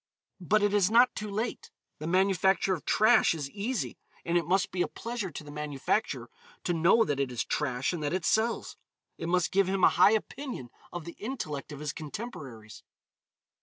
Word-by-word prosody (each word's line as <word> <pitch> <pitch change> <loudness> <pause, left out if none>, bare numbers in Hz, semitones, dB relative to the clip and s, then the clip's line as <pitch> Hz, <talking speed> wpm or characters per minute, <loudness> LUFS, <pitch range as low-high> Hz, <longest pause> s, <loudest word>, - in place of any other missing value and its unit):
But 205 +4 +2
it 205 -1 +2
is 200 -2 +4
not 240 +3 +5
too 210 0 -5
late. 220 +4 -3 0.3
The 155 - -5
manufacture 190 +1 +3
of 170 - -5
trash 215 -5 +4
is 145 -3 -5
easy, 215 +4 -3 0.3
and 170 - 0
it 170 -2 +2
must 185 +2 +2
be 180 - -1
a - - +2
pleasure 230 -4 -5
to 155 - -8
the 145 - -10
manufacturer 150 - -2 0.3
to 175 - 0
know 170 +7 +4
that 145 -8 -2
it 135 -2 0
is 120 - -1
trash 130 0 -1
and 170 - -4
that 145 - -1
it 185 -1 -1
sells. 225 +1 0 0.4
It 165 - -3
must 180 0 +2
give 195 0 +3
him 190 -1 0
a - - +8
high 210 - +5
opinion 220 - -4 0.2
of 175 -3 -6
the 170 - -9
intellect 180 - -5
of 145 0 -8
his 150 -1 -3
contemporaries. 140 - -8
180 Hz, 195 wpm, -29 LUFS, 150-210 Hz, 0.4 s, a